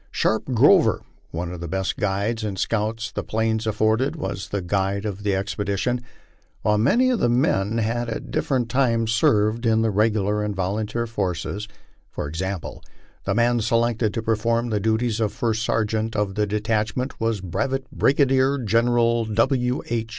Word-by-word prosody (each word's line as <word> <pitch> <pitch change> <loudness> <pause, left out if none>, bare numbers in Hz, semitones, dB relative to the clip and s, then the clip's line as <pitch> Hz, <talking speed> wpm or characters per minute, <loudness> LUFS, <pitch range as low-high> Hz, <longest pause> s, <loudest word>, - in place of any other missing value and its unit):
Sharpe 110 0 0
Grover, 130 - +4 0.3
one 85 +1 -4
of 90 - -7
the 85 - -5
best 95 +3 -2
guides 105 +3 -1
and 100 -3 -3
scouts 110 +3 -1
the - - -4
Plains 110 0 -1
afforded, 110 +7 +1
was 125 - -5
the 100 -2 -2
guide 100 +2 -1
of 105 -1 -4
the 100 -1 0
expedition, 100 +5 -1 0.6
while 105 0 +2
many 250 - +3
of 245 - 0
the 120 - +2
men 115 -4 +1
had 115 +1 -1
at 115 - -5
different 130 -4 0
times 115 -3 +1
served 110 0 +2
in 115 -1 +3
the 110 - +1
regular 105 0 +1
and 105 -1 -2
volunteer 105 +5 -2
forces; 100 -1 -3 0.4
for - - -5
example, 95 +3 -4 0.4
the 95 - 0
man 120 +1 +3
selected 115 0 +1
to 115 - -2
perform 115 +1 0
the 105 - +1
duties 110 +2 0
of 110 -3 +1
First 110 -2 -1
Sergeant 110 0 -1
of 105 -2 0
the 105 +1 0
detachment 110 +5 -1
was 115 -2 0
Brevet 130 +9 -2
Brigadier 135 0 +3
General 115 0 +2
W. 125 +3 +1
H. 115 -1 -2
110 Hz, 165 wpm, -23 LUFS, 105-120 Hz, 0.6 s, Grover